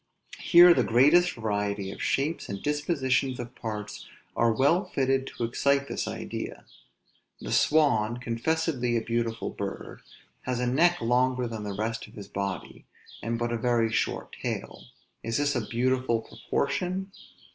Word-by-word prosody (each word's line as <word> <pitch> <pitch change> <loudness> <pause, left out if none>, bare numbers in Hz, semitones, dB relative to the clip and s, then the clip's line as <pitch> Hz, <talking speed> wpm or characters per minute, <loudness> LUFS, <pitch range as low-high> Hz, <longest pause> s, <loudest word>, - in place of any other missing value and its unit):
Here 175 0 +8
the - - +2
greatest 150 +10 +4
variety 105 -3 -2
of - - -9
shapes 150 +5 -1
and 100 - -4
dispositions 140 -3 0
of 120 +1 -6
parts 105 -3 -6 0.3
are 115 0 +3
well 140 - +3
fitted 135 -7 0
to - - -5
excite 140 +4 +1
this - - -3
idea. - - -6 0.7
The - - -6
swan, 120 -7 +3
confessedly 125 +1 -1
a 115 - -2
beautiful 115 -1 -2
bird, - - -6 0.4
has 125 -1 -2
a 125 - 0
neck 170 +8 +3
longer 125 +2 +2
than 115 -2 -6
the 100 -1 -4
rest 110 +3 -3
of 110 - -17
his 100 -2 -9
body, 100 -1 -5 0.3
and 115 +1 -2
but 120 0 -2
a 120 - 0
very 115 -1 +1
short - - -2
tail: - - -5 0.4
is 115 0 -2
this 145 0 +1
a 120 - +1
beautiful 125 -1 +1
proportion? 180 - -2
125 Hz, 150 wpm, -27 LUFS, 115-140 Hz, 0.7 s, Here